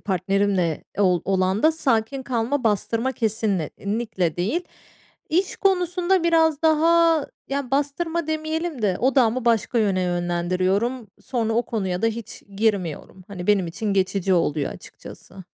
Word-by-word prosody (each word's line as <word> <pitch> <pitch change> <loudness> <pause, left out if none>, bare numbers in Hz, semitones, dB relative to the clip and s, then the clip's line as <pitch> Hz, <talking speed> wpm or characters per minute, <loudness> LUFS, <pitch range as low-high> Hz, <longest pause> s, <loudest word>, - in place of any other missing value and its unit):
partnerimle 190 -3 0
ol 180 -4 +3
olan 190 +1 +1
da 315 - +5
sakin 265 -3 0
kalma, 250 +1 -1
bastırma 230 +4 0
kesinlikle 205 - -2
değil. 220 - -1 0.6
İş 360 +5 0
konusunda 360 -1 +1
biraz 320 -2 +3
daha 325 0 +4 0.2
yani 275 -2 -3
bastırma 305 +4 -1
demeyelim 315 -3 -3
de 190 -3 +1
odağımı 255 -2 +2
başka 235 0 +2
yöne 195 -4 +1
yönlendiriyorum. 185 +7 -1
Sonra 230 -3 -1
o 235 +2 +2
konuya 190 -5 -2
da 225 - +4
hiç 225 -1 -5
girmiyorum. 190 -4 -2
Hani, 180 -3 -7
benim 200 -4 +3
için 205 +5 -3
geçici 190 -1 +1
oluyor 150 -4 0
açıkçası. 190 -1 -13
225 Hz, 125 wpm, -23 LUFS, 190-285 Hz, 0.6 s, da